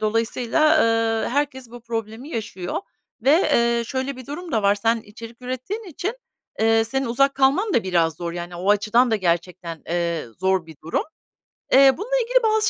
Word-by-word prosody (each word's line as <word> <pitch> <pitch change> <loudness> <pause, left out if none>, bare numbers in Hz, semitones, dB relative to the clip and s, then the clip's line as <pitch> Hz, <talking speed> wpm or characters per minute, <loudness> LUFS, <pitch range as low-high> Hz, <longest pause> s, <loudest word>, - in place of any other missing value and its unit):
dolayısıyla, 230 +8 +2 0.5
eee, - - -2
herkes 265 -3 -2
bu 240 - -10
problemi 230 +3 -5
yaşıyor 195 - -4 0.4
ve, 265 - +4
eee, 235 -7 +2
şöyle 260 +2 -3
bir 255 -2 -10
durum 330 +4 -7
da 220 - +1
var. 200 0 +4
Sen 225 +3 +1
içerik 230 +3 -12
ürettiğin 255 - -4
için, 380 - -4 0.4
eee, 225 0 +4
senin 270 +3 -2
uzak 275 +4 +2
kalman 280 +11 +2
da 230 - +3
biraz 170 -4 +1
zor. 170 0 -4
Yani, 175 0 -6
o 190 +4 0
açıdan 215 +4 +3
da 220 - +3
gerçekten, 170 -2 -2
eee, 170 -2 -1
zor 190 -2 +1
bir 160 -2 -12
durum. 165 - 0 0.7
Eee, 270 0 +7
bununla 465 +7 -2
ilgili - - +2
bazı 435 -1 +3
230 Hz, 175 wpm, -22 LUFS, 190-275 Hz, 0.7 s, Eee